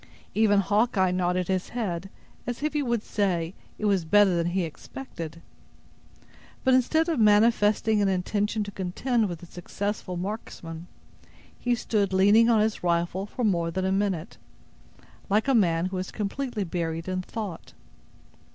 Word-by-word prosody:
Even 205 Hz, -2 st, +4 dB
Hawkeye 205 Hz, -2 st, +2 dB
nodded 180 Hz, 0 st, 0 dB
his 185 Hz, -1 st, -1 dB
head, 195 Hz, -6 st, -3 dB, 0.4 s
as 245 Hz, +3 st, -4 dB
if 305 Hz, -1 st, 0 dB
he 300 Hz, -, +1 dB
would 235 Hz, -5 st, -1 dB
say, 180 Hz, -5 st, -1 dB, 0.2 s
it 215 Hz, -, -3 dB
was 195 Hz, -4 st, +2 dB
better 200 Hz, +3 st, +5 dB
than 170 Hz, 0 st, +1 dB
he 180 Hz, +1 st, 0 dB
expected. 165 Hz, -, -8 dB, 1.2 s
But, 260 Hz, -, +4 dB
instead 315 Hz, +6 st, +3 dB
of 325 Hz, -6 st, 0 dB
manifesting 210 Hz, 0 st, +4 dB
an 200 Hz, -, +3 dB
intention 205 Hz, +3 st, 0 dB
to 205 Hz, -, -7 dB
contend 205 Hz, +4 st, -1 dB
with 175 Hz, -1 st, -6 dB
the -, -, -9 dB
successful 185 Hz, +2 st, -4 dB
marksman, 175 Hz, -4 st, -6 dB, 0.7 s
he 245 Hz, -1 st, +1 dB
stood 205 Hz, -4 st, 0 dB
leaning 205 Hz, +5 st, +5 dB
on 225 Hz, -2 st, +4 dB
his 215 Hz, 0 st, 0 dB
rifle 175 Hz, +3 st, 0 dB
for 245 Hz, -, -4 dB
more 170 Hz, -6 st, +1 dB
than 185 Hz, +3 st, -2 dB
a 190 Hz, -, +1 dB
minute, 190 Hz, -4 st, -1 dB, 0.9 s
like 210 Hz, +5 st, +2 dB
a 270 Hz, -, +3 dB
man 170 Hz, -7 st, +3 dB
who 185 Hz, 0 st, -3 dB
was 185 Hz, 0 st, -3 dB
completely 220 Hz, +1 st, -3 dB
buried 165 Hz, -2 st, -3 dB
in 185 Hz, 0 st, -1 dB
thought. 195 Hz, -3 st, -7 dB
200 Hz, 155 wpm, -26 LUFS, 180-220 Hz, 1.2 s, better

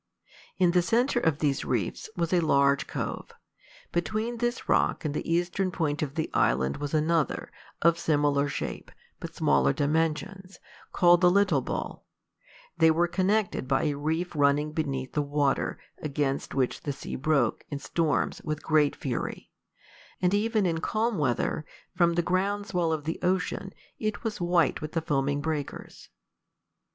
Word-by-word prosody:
In 180 Hz, -2 st, +4 dB
the 180 Hz, 0 st, +4 dB
centre 240 Hz, +7 st, +2 dB
of 160 Hz, -9 st, +1 dB
these 145 Hz, -3 st, 0 dB
reefs 115 Hz, -, -2 dB
was 170 Hz, 0 st, 0 dB
a 180 Hz, -, +5 dB
large 140 Hz, -3 st, +3 dB
cove. -, -, -4 dB, 0.6 s
Between 215 Hz, +7 st, -1 dB
this 240 Hz, 0 st, -2 dB
rock -, -, +2 dB
and 150 Hz, -, -1 dB
the 150 Hz, -, -3 dB
eastern 175 Hz, +3 st, +1 dB
point 160 Hz, -5 st, -1 dB
of 145 Hz, -2 st, -3 dB
the 160 Hz, -, -1 dB
island 65 Hz, +1 st, +2 dB
was 145 Hz, +1 st, -3 dB
another, 155 Hz, 0 st, 0 dB, 0.3 s
of 170 Hz, 0 st, +4 dB
similar 145 Hz, -2 st, +2 dB
shape, -, -, -5 dB, 0.3 s
but -, -, -8 dB
smaller 70 Hz, -1 st, +3 dB
dimensions, 165 Hz, +5 st, -1 dB, 0.3 s
called 175 Hz, 0 st, +5 dB
the 180 Hz, -, +6 dB
Little 185 Hz, -6 st, +3 dB
Bull: -, -, -5 dB, 0.7 s
they 160 Hz, -1 st, +5 dB
were 170 Hz, +2 st, +3 dB
connected 190 Hz, -3 st, 0 dB
by 135 Hz, 0 st, +1 dB
a 150 Hz, -, +1 dB
reef 160 Hz, +5 st, -2 dB
running 145 Hz, +1 st, +2 dB
beneath 135 Hz, -4 st, -3 dB
the 150 Hz, -, +1 dB
water, 145 Hz, -1 st, 0 dB, 0.2 s
against 140 Hz, -2 st, -2 dB
which 130 Hz, -2 st, 0 dB
the 145 Hz, -, -3 dB
sea 135 Hz, -, -7 dB
broke, 135 Hz, -4 st, +1 dB
in 145 Hz, -, -3 dB
storms, 155 Hz, +2 st, -1 dB
with 155 Hz, -1 st, -4 dB
great 155 Hz, -2 st, +3 dB
fury; 125 Hz, -4 st, -4 dB, 0.7 s
and 180 Hz, 0 st, +2 dB
even 215 Hz, 0 st, +1 dB
in 165 Hz, -2 st, 0 dB
calm 215 Hz, +3 st, 0 dB
weather, 140 Hz, +2 st, 0 dB, 0.3 s
from 170 Hz, -2 st, +3 dB
the 175 Hz, -, +2 dB
ground 200 Hz, +4 st, 0 dB
swell 175 Hz, -4 st, 0 dB
of 155 Hz, -2 st, -2 dB
the 160 Hz, +2 st, -3 dB
ocean, 185 Hz, +1 st, -1 dB, 0.3 s
it 215 Hz, -1 st, -3 dB
was 220 Hz, -5 st, -3 dB
white 175 Hz, -4 st, +2 dB
with 155 Hz, 0 st, -6 dB
the 165 Hz, -, 0 dB
foaming 145 Hz, -1 st, 0 dB
breakers. 150 Hz, -2 st, -5 dB
160 Hz, 160 wpm, -27 LUFS, 145-180 Hz, 0.7 s, the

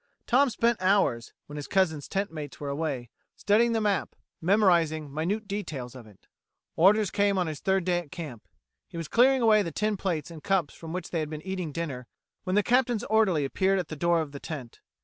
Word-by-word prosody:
Tom 270 Hz, +3 st, +4 dB
spent 235 Hz, -2 st, +1 dB
hours, 185 Hz, -, +2 dB
when 145 Hz, -, -9 dB
his 145 Hz, -, -6 dB
cousin's 160 Hz, -7 st, +1 dB
tentmates 160 Hz, -8 st, -4 dB
were 145 Hz, -, -4 dB
away, 140 Hz, -5 st, -3 dB, 0.2 s
studying 230 Hz, +3 st, +3 dB
the 225 Hz, -, +1 dB
map, 205 Hz, -3 st, -1 dB, 0.3 s
memorizing 165 Hz, -6 st, +2 dB
minute 195 Hz, +8 st, -2 dB
details 155 Hz, -, -5 dB
of 125 Hz, -4 st, -11 dB
it. 100 Hz, -3 st, -20 dB, 0.5 s
Orders 200 Hz, +3 st, +4 dB
came 200 Hz, -1 st, +2 dB
on 180 Hz, -, +1 dB
his 155 Hz, -3 st, -5 dB
third 190 Hz, -1 st, +1 dB
day 180 Hz, -1 st, +2 dB
at 160 Hz, -5 st, -11 dB
camp. 145 Hz, -10 st, -8 dB, 0.4 s
He -, -, -10 dB
was 165 Hz, -2 st, -4 dB
clearing 255 Hz, +4 st, +4 dB
away 215 Hz, -2 st, +5 dB
the 170 Hz, -4 st, -3 dB
tin 210 Hz, +5 st, -1 dB
plates 170 Hz, -5 st, -2 dB
and 160 Hz, -2 st, -10 dB
cups 190 Hz, -7 st, +1 dB
from 165 Hz, -1 st, -9 dB
which 180 Hz, +2 st, -5 dB
they 170 Hz, -, -1 dB
had 155 Hz, -1 st, -3 dB
been 155 Hz, 0 st, -7 dB
eating 185 Hz, -4 st, -4 dB
dinner, 140 Hz, -6 st, -5 dB, 0.4 s
when 185 Hz, 0 st, 0 dB
the 210 Hz, -, +4 dB
Captain's 245 Hz, -2 st, +2 dB
orderly 190 Hz, -10 st, +3 dB
appeared 190 Hz, +7 st, +1 dB
at 180 Hz, -4 st, -3 dB
the 155 Hz, -, -5 dB
door 170 Hz, +2 st, +2 dB
of 150 Hz, -3 st, -5 dB
the 140 Hz, -, -8 dB
tent. 135 Hz, -8 st, -8 dB
175 Hz, 210 wpm, -27 LUFS, 150-205 Hz, 0.5 s, away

